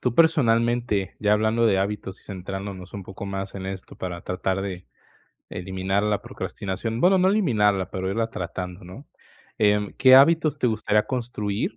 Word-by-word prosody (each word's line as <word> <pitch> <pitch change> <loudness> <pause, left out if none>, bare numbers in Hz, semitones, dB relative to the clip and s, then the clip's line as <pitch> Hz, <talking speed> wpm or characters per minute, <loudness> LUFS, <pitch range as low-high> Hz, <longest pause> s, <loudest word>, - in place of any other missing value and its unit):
tú, 125 - 0
personalmente, 120 - +2
ya 105 0 +3
hablando 110 +2 +2
de 95 -3 +3
hábitos 100 0 -3
y - - -18
centrándonos 95 -1 -7
un 100 -2 -6
poco 95 +1 -8
más 95 0 -5
en 95 - -6
esto 95 -1 -7
para 90 -1 -5
tratar 95 +1 -2
de 95 -2 -5 0.6
eliminar 95 +2 -2
la 105 -1 0
procrastinación, 110 +4 -4
bueno, 185 +4 +5
no 185 - +3
eliminarla, 105 - +2
pero 95 0 -3
irla 115 +3 -1
tratando, 90 0 -6
¿no?, 95 +11 -11 0.5
em, 105 -1 +2
¿qué 130 -1 +7
hábitos 155 +2 +5
te 125 - +2
gustaría 105 -1 +1
construir?, 115 -4 -3
105 Hz, 165 wpm, -24 LUFS, 95-115 Hz, 0.6 s, qué